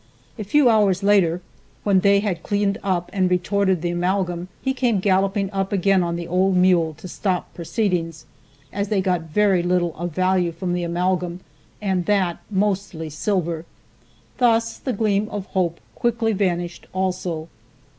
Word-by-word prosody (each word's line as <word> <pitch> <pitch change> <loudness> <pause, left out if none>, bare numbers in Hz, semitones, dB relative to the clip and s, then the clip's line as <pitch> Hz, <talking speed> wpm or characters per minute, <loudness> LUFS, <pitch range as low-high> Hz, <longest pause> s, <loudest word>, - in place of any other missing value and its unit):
A - - -2
few 275 +7 +3
hours 205 -4 +3
later, 185 -4 +3 0.4
when 200 -2 +4
they 200 +1 +4
had 190 -6 -2
cleaned 200 +1 0
up 180 -3 -1
and 185 -2 +2
retorted 185 0 +1
the 175 - 0
amalgam 180 0 -1
he 265 - -1
came 245 -6 +1
galloping 195 +1 +1
up 195 -1 -2
again 195 -1 +3
on 170 -1 -1
the 170 0 -5
old 185 +2 +2
mule 175 -4 +3
to 160 +5 -10
stop 180 0 -2
proceedings, 170 -3 -2 0.5
as 200 +1 -1
they 205 -1 +1
got 180 -2 +1
very 195 +1 +3
little 175 -1 0
of 175 +2 -3
value 185 0 +1
from 175 +2 -3
the 175 - -1
amalgam, 180 +1 -1 0.4
and 190 -3 0
that 190 -5 +1
mostly 190 -5 -1
silver. 170 0 -1 0.8
Thus 230 -2 +2
that 255 -6 -3
gleam 210 -1 +1
of 205 -2 -5
hope 175 -4 -1
quickly 230 -1 0
vanished 175 -3 -2
also. 180 -4 -2
185 Hz, 155 wpm, -22 LUFS, 175-200 Hz, 0.8 s, when